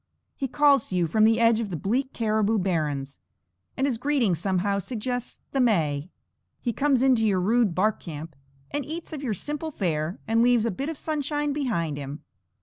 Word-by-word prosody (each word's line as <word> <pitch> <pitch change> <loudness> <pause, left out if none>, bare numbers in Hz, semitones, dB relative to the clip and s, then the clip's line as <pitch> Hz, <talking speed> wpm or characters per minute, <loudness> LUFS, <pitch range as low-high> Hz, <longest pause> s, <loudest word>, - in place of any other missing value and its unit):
He 270 - -2
calls 280 -1 +4
to 185 - -4
you 175 -1 +2
from 215 +7 +3
the 225 +1 +4
edges 230 -1 +4
of - - -9
the 175 - -3
bleak 255 - -1
caribou 220 -1 +1
barrens, 150 -7 -1 0.6
and 270 - +2
his 250 -5 -1
greeting 265 -7 +2
somehow 190 +3 0
suggests 245 +4 -4
the 275 - -1
May. 165 - +1 0.5
He 235 - -2
comes 275 0 +2
into 245 -5 +4
your 195 -3 +2
rude 210 -1 +2
bark 210 +3 +2
camp, 160 -2 -8 0.4
and 290 - -2
eats 320 +4 -6
of 295 - -5
your 240 -7 -1
simple 300 - -3
fare, 170 - -2
and 225 +1 +3
leaves 240 -2 +4
a 230 - +1
bit 275 - -4
of 320 - -5
sunshine 295 -1 -1
behind 170 - -1
him. 140 +2 -7
225 Hz, 190 wpm, -26 LUFS, 180-270 Hz, 0.6 s, calls